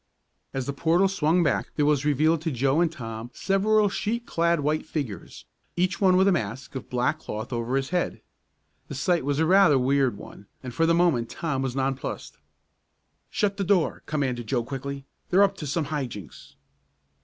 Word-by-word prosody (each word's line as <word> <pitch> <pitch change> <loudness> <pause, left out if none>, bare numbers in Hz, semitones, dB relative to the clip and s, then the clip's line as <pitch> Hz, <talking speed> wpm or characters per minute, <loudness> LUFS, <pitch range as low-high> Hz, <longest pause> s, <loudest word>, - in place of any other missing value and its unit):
As 135 -1 -3
the 140 - -3
portal 170 +6 +3
swung 175 -2 +2
back, 145 - 0
there 150 - +2
was 145 -1 +2
revealed 155 +2 +2
to 160 -1 -2
Joe 135 +5 +1
and 170 -2 +2
Tom 115 -5 -7
several 210 +2 +2
sheet 225 +4 -2
clad 170 -4 +1
white 150 +2 0
figures, 130 - -6 0.3
each 180 +1 0
one 185 -2 +5
with 190 +1 +4
a - - +5
mask 130 - -3
of 130 - -7
black 125 +5 0
cloth 110 -3 -6
over 120 +2 -2
his 135 0 -1
head. 180 -1 -1 0.7
The 140 - -7
sight 170 +4 +1
was 145 +1 -1
rather 175 -1 +5
a - - +4
weird 130 -3 +2
one, 100 - -12 0.2
and 125 -2 -6
for 165 +6 +2
the 165 - +4
moment 165 -10 +2
Tom 150 -5 -3
was 130 -1 -2
nonplussed. 135 -1 -3 0.9
"Shut 200 -1 0
the 200 - -1
door," 185 -3 +1
commanded 130 -6 -2
Joe 120 0 0
quickly. 140 +2 -6 0.2
"They're 190 +2 +5
up 200 - +2
to 150 - -5
some 155 +3 -1
high 145 -2 -2
jinks!" 105 -7 -11
150 Hz, 190 wpm, -25 LUFS, 130-175 Hz, 0.9 s, one